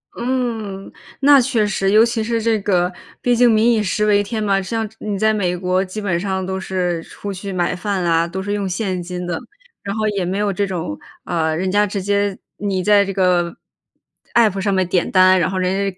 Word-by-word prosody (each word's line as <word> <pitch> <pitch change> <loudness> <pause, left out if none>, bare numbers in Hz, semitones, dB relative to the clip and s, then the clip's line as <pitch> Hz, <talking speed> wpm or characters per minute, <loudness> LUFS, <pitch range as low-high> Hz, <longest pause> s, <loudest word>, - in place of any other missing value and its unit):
嗯， 230 -6 -3 0.3
那 280 0 +7
确 235 -4 +1
实。 195 -1 0
尤 220 +2 +6
其 230 -1 -1
是 230 0 -1
这 225 -1 +1
个 180 -2 +1 0.3
毕 245 - +2
竟 240 0 +5
民 225 +2 +4
以 220 -2 +2
食 210 +2 0
为 205 -1 +4
天 215 +1 -3
嘛， 195 -1 +2
像 220 +2 -3
是 220 - -26
你 205 -2 -3
在 220 +1 +2
美 180 -4 0
国 185 +1 0
基 210 +3 -6
本 175 -4 0
上 190 -1 -2
都 190 0 -3
是 180 -3 -2
出 205 - -7
去 195 +1 -6
买 175 0 0
饭 190 0 -2
啦， 165 0 +2
都 190 +2 -5
是 205 - -4
用 205 -2 -1
现 185 -1 -2
金 180 0 -5
的。 175 -2 -3 0.4
然 200 +1 -4
后 215 0 0
也 195 -3 -2
没 190 +3 -2
有 205 -1 0
这 200 +1 -1
种 165 - -4 0.2
啊， 160 -2 -1
人 185 +2 -1
家 205 +1 +3
直 195 0 -3
接 200 0 0 0.2
你 195 -3 -2
在 205 -1 +5
这 195 - -4
个 180 -2 +1 0.8
App 215 -5 +4
上 200 0 0
面 185 -1 +2
点 180 -1 0
单， 185 0 +5
然 170 - +1
后 190 - -3
人 185 0 0 0.2
家 185 - -23
195 Hz, 250 characters per minute, -19 LUFS, 185-215 Hz, 0.8 s, 那